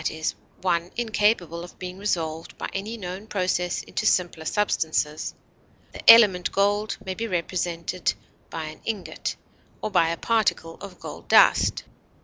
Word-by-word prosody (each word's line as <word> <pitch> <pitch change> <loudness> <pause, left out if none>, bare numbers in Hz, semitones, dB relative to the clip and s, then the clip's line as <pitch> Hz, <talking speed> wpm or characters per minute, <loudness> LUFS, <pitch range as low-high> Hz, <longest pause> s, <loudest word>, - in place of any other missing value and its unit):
e._, 160 0 -2 0.3
one 170 -2 +1
incapable 210 -7 +1
of 175 - -12
being 185 +1 -7
resolved 165 -5 -2
by - - -4
any 210 +4 -4
known 190 +1 -7
process 180 -3 -1
into - - -4
simpler 175 -6 +1
substances; 160 -6 0 0.6
the - - +8
element 205 -6 +6
gold 205 +2 +1
may 190 - -2
be 230 +4 -4
represented 175 -1 -1 0.4
by 165 - -5
an 155 0 -8
ingot 215 -5 -4 0.4
or - - -4
by 170 -4 +3
a 165 - -2
particle 215 -7 0
of 190 -2 -10
gold - - -9
dust. - - +5
180 Hz, 140 wpm, -25 LUFS, 170-205 Hz, 0.6 s, the